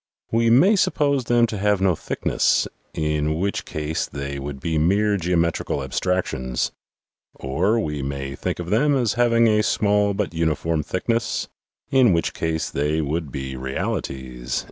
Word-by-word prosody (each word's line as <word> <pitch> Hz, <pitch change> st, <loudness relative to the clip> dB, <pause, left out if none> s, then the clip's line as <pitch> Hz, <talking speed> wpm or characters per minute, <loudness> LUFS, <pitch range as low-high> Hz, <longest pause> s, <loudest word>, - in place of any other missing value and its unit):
We 115 Hz, 0 st, +3 dB
may 170 Hz, -, +6 dB
suppose 145 Hz, -8 st, +1 dB
them 120 Hz, 0 st, +4 dB
to 110 Hz, -3 st, -4 dB
have 105 Hz, 0 st, +2 dB
no 95 Hz, -2 st, +3 dB
thickness, -, -, +1 dB, 0.3 s
in 75 Hz, 0 st, 0 dB
which 100 Hz, +2 st, -1 dB
case 75 Hz, +1 st, -3 dB
they 70 Hz, 0 st, -5 dB
would 70 Hz, 0 st, -6 dB
be 80 Hz, +2 st, -1 dB
mere 100 Hz, +6 st, +2 dB
geometrical 85 Hz, -5 st, 0 dB
abstractions; 65 Hz, -4 st, -1 dB, 0.6 s
or 90 Hz, +12 st, 0 dB
we 75 Hz, -8 st, -2 dB
may 70 Hz, 0 st, -4 dB
think -, -, -3 dB
of 90 Hz, +1 st, -5 dB
them 140 Hz, +7 st, +3 dB
as 120 Hz, -6 st, +1 dB
having 115 Hz, -1 st, +3 dB
a 105 Hz, -1 st, +3 dB
small 105 Hz, -1 st, +2 dB
but 100 Hz, -4 st, -2 dB
uniform 80 Hz, 0 st, 0 dB
thickness, 115 Hz, +9 st, -1 dB, 0.4 s
in 130 Hz, -7 st, +5 dB
which 85 Hz, -, 0 dB
case 80 Hz, 0 st, -2 dB
they 75 Hz, +3 st, 0 dB
would 75 Hz, 0 st, -2 dB
be 65 Hz, -2 st, -5 dB
realities." 65 Hz, -1 st, -3 dB
85 Hz, 150 wpm, -23 LUFS, 75-105 Hz, 0.6 s, may